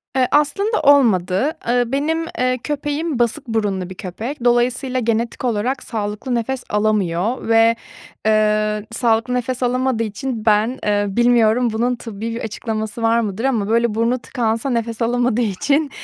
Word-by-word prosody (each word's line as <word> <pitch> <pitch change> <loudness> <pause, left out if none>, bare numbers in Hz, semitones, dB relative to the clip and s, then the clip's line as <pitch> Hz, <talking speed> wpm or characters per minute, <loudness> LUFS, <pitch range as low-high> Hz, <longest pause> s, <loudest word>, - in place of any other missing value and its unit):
Eee, 255 -1 +3
aslında 400 +9 +2
olmadı. 240 - +3 0.2
Iıı, 245 0 +1
benim, 315 +4 0
eee, 255 0 +1
köpeğim 295 0 -2
basık 235 +1 0
burunlu 205 -5 -1
bir 185 - -8
köpek. 230 +9 -6
Dolayısıyla 250 +2 +2
genetik 230 +2 -1
olarak 245 +3 -1
sağlıklı 215 +3 -3
nefes 250 +2 -2
alamıyor 210 +1 0
ve, 225 0 +5 0.5
eee, 215 -1 +2
sağlıklı 230 +1 +1
nefes 250 +1 -2
alamadığı 250 -1 +1
için 225 +1 -4
ben, 220 +4 +2
eee, 205 -1 +1
bilmiyorum 240 +1 +3
bunun 245 +2 0
tıbbi 225 -1 -6
bir - - -4
açıklaması 220 0 -4
var 230 +1 +3
mıdır 215 0 -3
ama 220 -6 0
böyle 230 -1 +2
burnu 235 +3 +1
tıkansa 230 0 -2
nefes 230 -2 -2
alamadığı 245 0 +1
için, 280 +8 +1
235 Hz, 145 wpm, -19 LUFS, 215-255 Hz, 0.5 s, ve